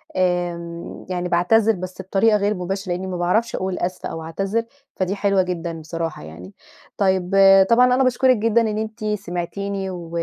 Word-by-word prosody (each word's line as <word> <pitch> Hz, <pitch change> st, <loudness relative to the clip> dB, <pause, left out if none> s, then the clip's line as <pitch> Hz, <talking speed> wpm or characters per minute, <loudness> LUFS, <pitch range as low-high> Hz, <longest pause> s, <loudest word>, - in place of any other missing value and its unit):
آمم 175 Hz, -2 st, -2 dB
يعني 180 Hz, -1 st, -2 dB
باعتذر 215 Hz, +6 st, +3 dB
بس 185 Hz, +1 st, -7 dB
بطريقة 205 Hz, +3 st, +2 dB
غير 205 Hz, +1 st, +1 dB
مباشرة 190 Hz, +1 st, -4 dB
لإنّي 185 Hz, +2 st, -4 dB
ما 180 Hz, -, -4 dB
باعرفش 185 Hz, +7 st, 0 dB
أقول 185 Hz, -1 st, -3 dB
أسفة 180 Hz, +1 st, -3 dB
أو 160 Hz, -, -6 dB
أعتذر، 195 Hz, +7 st, -2 dB, 0.3 s
فدي 185 Hz, +1 st, -1 dB
حلوة 200 Hz, -1 st, +2 dB
جدًا 170 Hz, -2 st, -4 dB
بصراحة 165 Hz, -, -5 dB
يعني. 85 Hz, +5 st, -11 dB, 0.4 s
طيب 190 Hz, -2 st, +1 dB
آآ 195 Hz, 0 st, +7 dB
طبعًا 235 Hz, +5 st, +4 dB
أنا 265 Hz, -, +3 dB
باشكُرِك 255 Hz, -1 st, +3 dB
جدًا 230 Hz, +2 st, +2 dB
إن 215 Hz, -2 st, -1 dB
أنت 220 Hz, +1 st, -5 dB
سمعتيني 200 Hz, 0 st, -3 dB
و 175 Hz, -3 st, -7 dB
190 Hz, 170 wpm, -21 LUFS, 175-210 Hz, 0.4 s, آآ